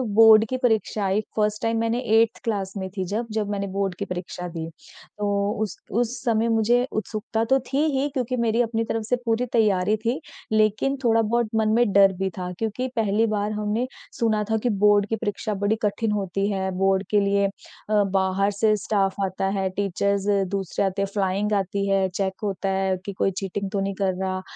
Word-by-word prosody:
Board 225 -1 +9
की 255 - -1
परीक्षा 220 -4 0
आई 195 +3 +1 0.2
1st 210 0 +1
time 225 0 +1
मैंने 230 +1 0 0.2
8th 230 - -1
क्लास 200 -4 -2
में 190 -1 -4
थी 190 - 0
जब 220 +5 -2
जब 210 -2 -1
मैंने 200 -1 -2
बोर्ड 195 -2 -1
की - - -2
परीक्षा 180 0 -5
दिए। 165 -1 -5 0.5
तो 205 0 0
उस 210 - -4 0.2
उस 240 +3 0
समय 230 -2 +2
मुझे 235 +3 +3
उत्सुकता 215 +1 -2
तो 270 +3 +3
थी 280 +3 +2
ही 275 +2 +1
क्योंकि 255 -2 -2
मेरी 230 0 +2
अपनी 225 -1 0
तरफ 225 0 -2
से 250 - +4
पूरी 230 +2 +1
तैयारी 210 -2 +3
थी, 235 +7 -1 0.3
लेकिन 215 +6 +2
थोड़ा 225 -1 +4
बहुत 230 0 0
मन 220 -1 +2
में 235 -3 +3
डर 195 -1 +6
भी 190 0 0
था 180 0 -4
क्योंकि 225 +4 -2
पहली 220 0 +2
बार 210 0 -1
हमने 210 +4 -1 0.3
सुना 220 -2 +2
था 220 - +3
कि 245 - +2
बोर्ड 205 0 +4
की 225 - +1
परीक्षा 210 -1 -3
बड़ी 205 +2 0
कठिन 210 +1 0
होती 195 -1 -1
है, 190 -1 -1
बोर्ड 195 0 +2
के 210 - +4
लिए 200 0 +2
अ, 205 +1 -2
बाहर 195 +1 +2
से 215 +1 +2
स्टाफ़ 195 -1 0
आता 190 +1 -3
है, 190 0 0
टीचर्स 200 +1 -1 0.3
दूसरे 195 0 -1
आते 195 +1 -1
हैं। 195 - 0
फ़्लाइंग 200 +1 0
आती 200 0 0
है, 195 -1 +2
चेक 190 +1 -2
होता 195 -1 -2
है 190 -1 0
कि 200 - -4
कोई 195 - 0
चीटिंग 195 0 -3
तो 200 - -1
नहीं 195 0 -1
कर 190 -2 0
रहा। 185 0 -2
205 Hz, 205 wpm, -24 LUFS, 195-225 Hz, 0.5 s, बोर्ड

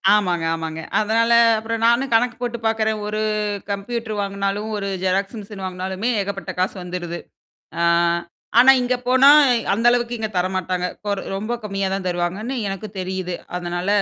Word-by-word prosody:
ஆமாங்க, 180 -5 0
ஆமாங்க. 160 0 -5 0.2
அதனால 225 +2 +2 0.3
அப்புறம் 225 +1 -3
நானும் 240 +3 +3
கணக்கு 240 +1 +3
போட்டுப் 235 -2 -4
பாக்குறேன். 220 -1 +1
ஒரு 210 0 -2 0.5
கம்ப்யூட்டர் 215 +1 -3
வாங்குனாலும், 200 +1 -2
ஒரு 200 -1 -3
ஜெராக்ஸ் 195 +4 0
மெஷின் 200 -1 -9
வாங்கினாலுமே 185 +4 -3
ஏகப்பட்ட 195 -1 -4
காசு 185 +2 0
வந்துருது. 175 -1 -5 0.6
ஆ - - +1 0.8
ஆனா 260 +2 +9
இங்கே 250 0 0
போனா 260 +2 +5 0.5
அந்த 230 +4 -1
அளவுக்கு 240 0 0
இங்கே 220 -1 -3
தரமாட்டாங்க. 185 0 -1
இப்ப 210 - -13
ஒரு 195 - -4 0.2
ரொம்ப 215 +4 -3
கம்மியா 195 -2 -2
தான் 195 -1 -3
தருவாங்கன்னு 180 +8 -2
எனக்குத் 195 +1 -6
தெரியுது. 185 -1 -3 0.2
அதனால, 175 +1 -4
200 Hz, 150 wpm, -21 LUFS, 185-225 Hz, 0.8 s, ஆனா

